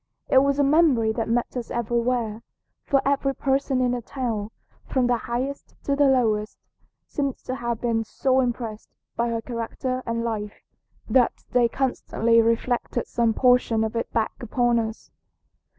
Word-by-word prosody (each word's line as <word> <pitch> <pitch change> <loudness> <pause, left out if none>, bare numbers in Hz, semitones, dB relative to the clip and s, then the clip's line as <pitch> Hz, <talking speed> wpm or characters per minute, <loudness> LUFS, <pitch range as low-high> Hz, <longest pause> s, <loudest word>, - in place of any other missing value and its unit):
It 265 - +6
was 280 0 +1
a 285 - +3
memory 275 -7 +4
that 225 0 -2
met 240 +2 0
us 245 -2 -4
everywhere, 235 -1 -1 0.4
for 275 -1 +2
every 275 -1 +1
person 270 -1 0
in 250 -1 +2
the 245 -1 -2
town, 230 -5 -3 0.4
from 260 -2 +1
the 245 0 +3
highest 260 +4 -3
to 280 - 0
the 285 0 +4
lowest, 220 -5 +1 0.5
seemed 275 -3 -2
to 255 - -4
have 235 -3 -3
been 230 -2 +1
so 260 +4 +1
impressed 235 -4 -3 0.3
by 235 0 0
her 230 -1 -2
character 255 +2 -3
and 230 0 -1
life 210 -3 -4 0.4
that 250 -3 +2
they 245 -1 +4
constantly 230 -2 +1
reflected 235 +1 0
some 230 -2 +1
portion 245 -3 +3
of 220 +1 -3
it 230 - -2
back 225 +4 -1
upon 240 0 +1
us. 220 -1 -5
240 Hz, 160 wpm, -24 LUFS, 230-260 Hz, 0.5 s, It